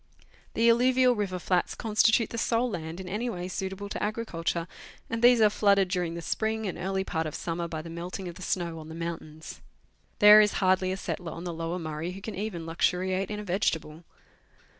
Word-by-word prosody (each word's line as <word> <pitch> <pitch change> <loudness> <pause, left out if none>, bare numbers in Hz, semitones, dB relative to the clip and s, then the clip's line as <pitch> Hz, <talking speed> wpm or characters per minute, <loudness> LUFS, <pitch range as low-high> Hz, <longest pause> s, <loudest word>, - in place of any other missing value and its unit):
The 230 - +3
alluvial 250 +2 +5
river 200 -5 -2
flats 180 0 0
constitute 220 0 +2
the 230 - -3
sole 230 +2 +1
land 165 -2 -5
in 190 - -7
any 215 +6 -2
way 180 -4 -4
suitable 190 +2 -4
to - - -4
agriculture, 180 -6 -2 0.4
and 230 0 -2
these 245 0 +6
are 215 - +7
flooded 200 -3 +3
during 175 -3 -1
the 170 - -6
spring 220 +3 -1
and 190 - -3
early 190 +1 -2
part 160 -4 -2
of 150 - -6
summer 170 0 -3
by 160 -2 -5
the 165 - -8
melting 180 +3 -6
of 175 - -6
the 185 - -13
snow 170 -3 -2
on 155 0 -10
the 160 - -8
mountains. 165 -2 -7 0.6
There 210 0 +9
is 210 -1 +2
hardly 185 -1 +2
a 190 - -2
settler 175 -4 -5
on 170 - -8
the 175 -1 -4
Lower 165 +2 -3
Murray 160 +1 -4
who 195 - -9
can 220 - -6
even 185 -4 -4
luxuriate 185 +3 0
in 210 0 -4
a - - -5
vegetable. 175 -4 -1
185 Hz, 205 wpm, -28 LUFS, 170-210 Hz, 0.6 s, There